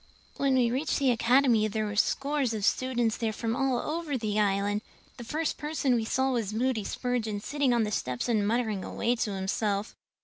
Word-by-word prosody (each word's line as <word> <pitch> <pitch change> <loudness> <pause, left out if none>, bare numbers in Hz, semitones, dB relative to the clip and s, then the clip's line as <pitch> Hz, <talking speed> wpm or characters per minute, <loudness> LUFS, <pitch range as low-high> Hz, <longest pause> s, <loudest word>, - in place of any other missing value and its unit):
"When 275 -1 +2
we 245 -2 +3
reached 275 +5 0
the 275 -3 +3
Academy 240 -1 +3
there 215 0 -2
were 205 -1 -4
scores 275 +2 +1
of 205 -2 -1
students 240 -2 +1
there 225 -2 -1
from 225 +1 -2
all 270 -1 +1
over 305 +1 -2
the 215 -2 -1
Island. 205 0 +1 0.4
The 240 - -7
first 305 +6 -2
person 295 -3 0
we 230 -2 +1
saw 265 +3 +1
was 220 -4 -2
Moody 240 -2 0
Spurgeon 225 -3 -2
sitting 280 +4 0
on 235 -2 +3
the 210 - -2
steps 125 -10 -2
and 215 -4 +1
muttering 220 -4 0
away 240 +1 -1
to 210 -3 -1
himself. 200 +2 -1
235 Hz, 195 wpm, -28 LUFS, 210-260 Hz, 0.4 s, we